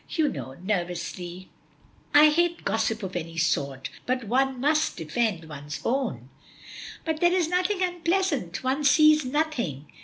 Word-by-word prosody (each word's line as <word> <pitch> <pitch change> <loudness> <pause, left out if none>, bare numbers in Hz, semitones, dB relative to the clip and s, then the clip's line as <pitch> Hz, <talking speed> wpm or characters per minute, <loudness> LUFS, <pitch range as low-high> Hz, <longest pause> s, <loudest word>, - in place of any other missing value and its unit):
You 315 -3 +1
know," 130 - -7
nervously, 180 -1 -4 0.6
"I 300 +1 +8
hate 345 +2 0
gossip 220 0 0
of 185 -1 -5
any 165 -1 -5
sort, 140 -5 -1 0.2
but 255 0 0
one 260 +3 +1
must 305 +4 +1
defend 170 +1 -1
one's 150 0 -7
own." 230 - -1 0.8
"But 320 -1 -1
there 345 0 +5
is 360 -3 +2
nothing 365 +2 +1
unpleasant; 345 - -1
one 265 +3 0
sees 305 +1 +6
nothing. 250 - -2
250 Hz, 140 wpm, -26 LUFS, -, 0.8 s, I